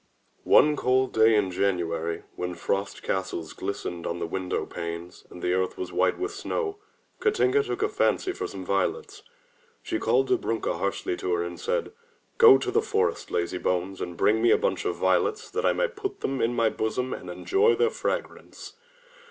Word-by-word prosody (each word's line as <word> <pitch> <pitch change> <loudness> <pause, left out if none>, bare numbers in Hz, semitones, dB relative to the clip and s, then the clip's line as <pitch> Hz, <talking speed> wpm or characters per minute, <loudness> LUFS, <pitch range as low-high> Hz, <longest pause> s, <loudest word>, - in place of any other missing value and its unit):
One 150 0 +6
cold 130 -1 +1
day 110 0 +5
in 100 -3 +1
January, 85 -3 -1
when 90 0 -4
frost 100 +3 -2
castles 85 -4 -3
glistened 90 -3 -4
on 85 - -2
the - - -3
window 90 +2 -2
panes 85 +1 -7
and 90 - -11
the 90 - +1
earth 95 0 -1
was 90 -1 -5
white - - +2
with 385 +3 -3
snow, 405 +1 -3 0.4
Katinka 430 -2 +3
took 430 +1 -3
a - - +3
fancy 400 -2 +1
for 370 - -4
some - - -8
violets. 470 - -1 0.6
She - - -2
called 435 -4 +2
Dobrunka 385 +6 0
harshly 370 - -1
to 390 +1 -3
her 425 - -1
and - - -6
said, 475 +1 -1 0.5
"Go 455 -4 +9
to 390 - -3
the 445 +3 +3
forest, 445 +1 -1
lazy 85 +1 -1
bones, 90 +1 -1
and 85 -1 -5
bring 110 +1 +3
me 120 - +4
a - - +6
bunch - - -1
of - - 0
violets, 445 0 +1
that - - 0
I - - +4
may - - +1
put 415 -4 -6
them 135 0 -1
in 120 +1 +1
my 115 -1 +3
bosom 125 +4 -2
and 90 - -7
enjoy 390 - +2
their 465 -1 +2
fragrance. - - -5
125 Hz, 185 wpm, -26 LUFS, -, 0.6 s, Go